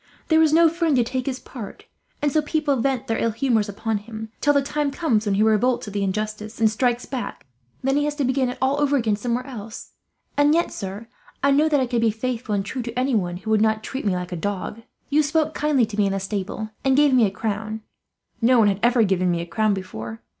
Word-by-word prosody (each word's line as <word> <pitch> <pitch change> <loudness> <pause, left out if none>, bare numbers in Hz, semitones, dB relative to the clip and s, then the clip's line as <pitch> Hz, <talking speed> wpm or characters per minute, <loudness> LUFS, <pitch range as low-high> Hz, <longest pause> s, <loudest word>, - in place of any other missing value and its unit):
There 320 0 +5
is 315 -2 +4
no 330 +1 +6
friend 330 -2 +1
to 245 - +4
take 255 +2 -3
his 260 -1 -2
part, 230 -7 -9 0.4
and 290 - +2
so 310 - +3
people 300 -1 0
vent 265 +1 0
their 225 -3 -1
ill 230 - +1
humours 225 -2 +1
upon 215 +1 -2
him, 220 +1 -8
till 290 - +4
the 280 -1 +3
time 295 +1 -1
comes 250 -8 0
when 200 - +2
he 210 - +3
revolts 220 +2 +2
at 205 - -7
the 205 - -1
injustice 215 +3 -3
and 220 -1 +4
strikes 240 +2 0
back; 260 - -5 0.4
and - - -2
then 270 +1 +3
he 290 - +2
has 295 0 -2
to 290 - -1
begin 260 0 +1
it 250 - -5
all 270 +2 +1
over 285 -1 +3
again, 225 -5 +1
somewhere 240 +4 -2
else. 225 -5 -8 0.4
"And 290 +2 +4
yet, 340 - +1
sir, 200 +3 -6 0.4
I 280 - +4
know 300 +3 +4
that 295 -2 +3
I 260 - +2
could 240 -1 -1
be 230 - +4
faithful 225 0 -2
and 195 -1 -1
true 255 +5 -4
to 235 +1 -6
anyone 215 -10 0
who 205 +4 -5
would 215 -1 +4
not 220 0 +2
treat 265 +4 -5
me 195 -3 +1
like 180 0 -4
a - - -2
dog. 205 +4 -4 0.3
You 300 +2 +5
spoke 310 +1 +1
kindly 295 -5 +2
to 215 -1 -8
me 205 -1 +3
in 195 - -1
the 195 - -1
stable, 205 +2 -4
and 270 0 +3
gave 290 -2 +5
me 240 -4 +5
a - - -1
crown. 215 +2 -4 0.6
No 245 +2 +5
one 215 -3 +5
had 195 -1 -1
ever 240 -1 +4
given 185 -3 +1
me 175 -1 0
a 170 - -3
crown 210 +4 +1
before. 115 - -7
230 Hz, 255 wpm, -23 LUFS, 210-275 Hz, 0.6 s, no